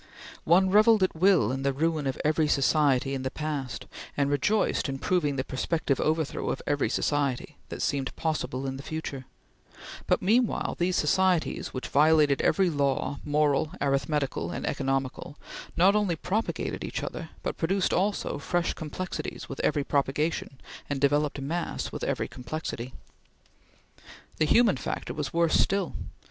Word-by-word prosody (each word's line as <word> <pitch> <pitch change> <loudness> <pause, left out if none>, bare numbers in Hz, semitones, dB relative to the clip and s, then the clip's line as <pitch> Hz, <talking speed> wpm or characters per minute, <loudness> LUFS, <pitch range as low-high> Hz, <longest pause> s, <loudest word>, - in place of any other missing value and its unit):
One 185 +3 +4
revelled 215 0 +6
at 185 - +1
will 170 - +4
in 135 +1 -3
the 140 0 +1
ruin 155 0 0
of 135 - -2
every 155 0 +2
society 140 -2 +2
in 135 - -2
the 130 - -2
past, 145 -3 -4 0.3
and 140 0 +1
rejoiced 150 +3 +1
in 135 - -3
proving 150 -2 0
the 130 - -1
prospective 140 +1 -1
overthrow 155 -1 0
of - - -2
every 145 -1 +1
society 140 -4 -1
that - - -4
seemed 135 -2 -1
possible 150 -4 -2
in 135 0 -3
the - - -7
future; 140 -4 -5 0.8
but - - +3
meanwhile 230 +5 +1
these 175 +1 +1
societies 185 +1 +2
which 130 - -5
violated 150 -1 +4
every 195 -2 +3
law, 140 -2 0
moral, 150 0 +1
arithmetical, 140 0 0
and - - -4
economical, 135 +1 -2 0.4
not 190 +4 +5
only 205 -5 +1
propagated 200 +8 -2
each - - -4
other, - - -5
but - - -3
produced 185 +3 +1
also 200 -3 0
fresh 175 +3 0
complexities 175 +4 -5
with 135 - -7
every 145 -2 +1
propagation 140 0 -1 0.3
and 145 -1 -1
developed 145 +1 +2
mass 160 +6 -3
with - - -6
every - - -1
complexity. 130 -2 -6 1.4
The 155 - +3
human 220 - +4
factor 120 - -4
was 150 -1 -3
worse 170 -1 +3
still. 195 -2 +1
150 Hz, 150 wpm, -27 LUFS, 135-175 Hz, 1.4 s, revelled